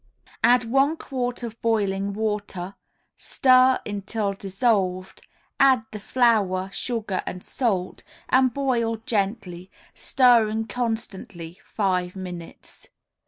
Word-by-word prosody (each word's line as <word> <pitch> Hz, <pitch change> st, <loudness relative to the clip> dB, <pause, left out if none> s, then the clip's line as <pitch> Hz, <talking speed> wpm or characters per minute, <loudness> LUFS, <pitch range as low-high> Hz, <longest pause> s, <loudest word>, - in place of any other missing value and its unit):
Add 245 Hz, +1 st, +5 dB
one 270 Hz, +7 st, +2 dB
quart 245 Hz, -4 st, -4 dB
of 230 Hz, -1 st, -7 dB
boiling 200 Hz, -3 st, 0 dB
water, 205 Hz, -3 st, -3 dB, 0.4 s
stir 255 Hz, 0 st, +4 dB
until 205 Hz, 0 st, -3 dB
dissolved, 195 Hz, -2 st, -1 dB, 0.4 s
add 260 Hz, -5 st, +5 dB
the 215 Hz, -, -6 dB
flour, 200 Hz, -5 st, +1 dB
sugar 220 Hz, -6 st, -3 dB
and 180 Hz, -, -6 dB
salt, 195 Hz, -8 st, -1 dB, 0.3 s
and 260 Hz, 0 st, +4 dB
boil 240 Hz, -4 st, 0 dB
gently, 195 Hz, -4 st, -2 dB, 0.2 s
stirring 225 Hz, -4 st, +3 dB
constantly, 210 Hz, -7 st, -5 dB, 0.2 s
five 185 Hz, -3 st, 0 dB
minutes. 180 Hz, -3 st, -9 dB
215 Hz, 100 wpm, -24 LUFS, 190-245 Hz, 0.4 s, Add